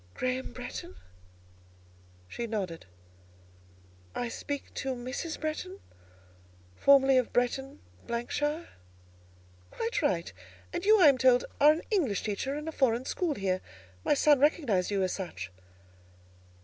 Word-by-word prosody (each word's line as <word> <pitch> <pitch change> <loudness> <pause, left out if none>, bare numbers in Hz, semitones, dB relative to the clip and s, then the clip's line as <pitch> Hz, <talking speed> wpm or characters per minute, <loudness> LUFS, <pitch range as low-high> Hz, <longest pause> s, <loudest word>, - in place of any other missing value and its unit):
"Graham 255 +1 -2
Bretton?" 245 - -7 1.3
She 235 - -5
nodded. 190 - -4 1.3
"I 245 - -2
speak 285 +4 -5
to 265 -1 -3
Mrs. 255 +7 -5
Bretton, 365 +5 -4 1.0
formerly 270 - +6
of 250 - -2
Bretton, 255 - -1 0.3
——shire?" 295 +7 -2 1.0
"Quite 225 - -2
right; 170 -2 0 0.4
and 345 - -3
you, 430 +1 +6
I 360 - +7
am 275 -3 +5
told, 250 -1 +5
are 295 +1 +8
an 315 +2 -2
English 280 - +1
teacher 220 +7 -2
in 300 +2 -5
a - - -2
foreign 255 -4 +1
school 335 -1 -1
here: 185 -3 -1 0.4
my - - +3
son 290 -1 +5
recognised 270 - +2
you 200 -2 +1
as 185 - 0
such." 180 - -6
260 Hz, 125 wpm, -29 LUFS, 225-295 Hz, 1.3 s, are